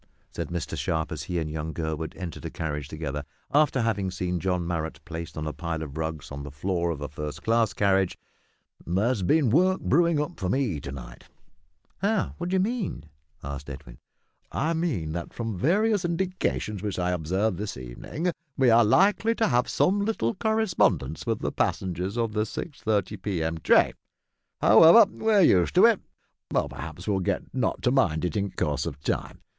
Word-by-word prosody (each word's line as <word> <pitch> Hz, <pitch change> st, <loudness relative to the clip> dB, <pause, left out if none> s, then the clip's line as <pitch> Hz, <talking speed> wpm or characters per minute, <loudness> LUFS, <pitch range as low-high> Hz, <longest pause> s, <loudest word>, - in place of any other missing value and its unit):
"H'm!" -, -, -38 dB
said -, -, -3 dB
Mr 85 Hz, -2 st, -4 dB
Sharp, 80 Hz, -1 st, -1 dB
as -, -, -4 dB
he 90 Hz, -, -3 dB
and 80 Hz, -2 st, -1 dB
young 80 Hz, +1 st, -4 dB
Gurwood 80 Hz, -1 st, -3 dB
entered 90 Hz, -4 st, -6 dB
a -, -, -2 dB
carriage 75 Hz, -3 st, -4 dB
together, 75 Hz, -2 st, -4 dB, 0.3 s
after 145 Hz, -3 st, +4 dB
having 100 Hz, -4 st, 0 dB
seen 90 Hz, -1 st, -2 dB
John 90 Hz, -1 st, -1 dB
Marrot 80 Hz, -2 st, -3 dB
placed 85 Hz, -1 st, -7 dB
on 75 Hz, -, -3 dB
a 75 Hz, -, -3 dB
pile 80 Hz, -2 st, -3 dB
of 70 Hz, -2 st, -8 dB
rugs 80 Hz, -2 st, -4 dB
on 70 Hz, 0 st, -6 dB
the 70 Hz, -, -7 dB
floor 85 Hz, +4 st, -1 dB
of 80 Hz, -4 st, -3 dB
a 75 Hz, -, -3 dB
first 75 Hz, +2 st, -6 dB
class 115 Hz, -1 st, +2 dB
carriage; 95 Hz, -2 st, +2 dB, 0.7 s
"there's 100 Hz, +6 st, 0 dB
been 135 Hz, -, +3 dB
work 185 Hz, +7 st, +4 dB
brewin' 170 Hz, -2 st, +3 dB
up 150 Hz, +4 st, -3 dB
for 90 Hz, -, -1 dB
me 110 Hz, -, 0 dB
to 70 Hz, -, -7 dB
night." -, -, -10 dB, 0.7 s
"How? 210 Hz, +1 st, 0 dB
What 175 Hz, +1 st, -3 dB
do 190 Hz, -, +1 dB
you -, -, +3 dB
mean?" 200 Hz, -, -2 dB, 0.3 s
asked 70 Hz, 0 st, -6 dB
Edwin. 65 Hz, -3 st, -10 dB, 0.5 s
"I 160 Hz, +4 st, 0 dB
mean 150 Hz, -, -1 dB
that, 85 Hz, +1 st, -5 dB
from 115 Hz, -3 st, -3 dB
various 200 Hz, -, +2 dB
indications 170 Hz, -, -1 dB
which 105 Hz, -2 st, -3 dB
I 90 Hz, 0 st, 0 dB
observed 90 Hz, +4 st, 0 dB
this 105 Hz, -7 st, -4 dB
evening, 65 Hz, -, -4 dB, 0.3 s
we 130 Hz, -3 st, +5 dB
are 115 Hz, +1 st, +7 dB
likely 200 Hz, -, +3 dB
to 225 Hz, -, +2 dB
have 120 Hz, +1 st, +2 dB
some 200 Hz, +2 st, +2 dB
little 200 Hz, -, 0 dB
correspondence 180 Hz, -, +1 dB
with -, -, 0 dB
the -, -, -1 dB
passengers 95 Hz, +3 st, -1 dB
of 115 Hz, -2 st, 0 dB
the 105 Hz, -, +1 dB
6:30 105 Hz, -, -2 dB
p.m. 80 Hz, -5 st, -2 dB
train. -, -, +4 dB, 0.7 s
However, 165 Hz, -, +9 dB
we're 220 Hz, -2 st, +3 dB
used 90 Hz, -, +4 dB
to -, -, +8 dB
it; -, -, +5 dB, 0.5 s
perhaps 80 Hz, +5 st, -3 dB
we'll 100 Hz, -2 st, +1 dB
get 95 Hz, 0 st, -2 dB
not 130 Hz, -, -1 dB
to 125 Hz, -, +3 dB
mind 90 Hz, -, +2 dB
it 85 Hz, -, -2 dB
in 100 Hz, -1 st, 0 dB
course 75 Hz, -5 st, -1 dB
of -, -, -6 dB
time. -, -, -3 dB
95 Hz, 185 wpm, -26 LUFS, -, 0.7 s, However